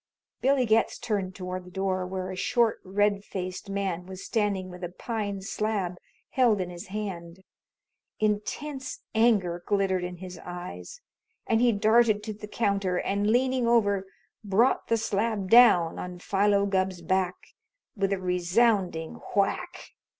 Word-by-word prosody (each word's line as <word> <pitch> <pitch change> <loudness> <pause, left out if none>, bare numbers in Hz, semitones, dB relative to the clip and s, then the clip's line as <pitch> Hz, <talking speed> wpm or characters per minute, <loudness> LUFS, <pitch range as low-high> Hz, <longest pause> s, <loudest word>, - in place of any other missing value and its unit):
Billy 270 -1 +3
Getz 220 0 +2
turned 195 -5 -2
toward 185 -1 -5
the 180 - -13
door, 185 -1 -1
where 185 0 -4
a - - -5
short, 230 +4 +1
red 200 +1 +1
faced 185 0 -6
man 190 -3 -2
was 190 0 -8
standing 200 -4 -1
with 180 +1 -10
a 175 - -3
pine 200 0 -4
slab 195 -3 -2 0.3
held 240 -6 +3
in 180 -1 -3
his 175 0 -9
hand. 190 -3 -6 0.8
Intense 265 - -2
anger 205 -7 +2
glittered 195 -3 +1
in 180 0 -4
his 180 -1 -9
eyes, 180 - -8 0.4
and 225 0 +2
he 245 -1 +5
darted 215 0 +3
to 215 0 -4
the 210 0 -9
counter 200 -4 0
and, 200 +3 0
leaning 255 +1 +2
over, 205 -5 +2 0.4
brought 215 +6 +2
the 230 - +2
slab 210 -2 -1
down 225 -9 +6
on 180 0 -6
Philo 200 +2 +2
Gubb's 190 -3 -1
back 185 +1 +1 0.6
with 195 -2 0
a 195 - +1
resounding 180 -1 +1 0.2
whack. 200 -1 -1
200 Hz, 145 wpm, -27 LUFS, 185-220 Hz, 0.8 s, down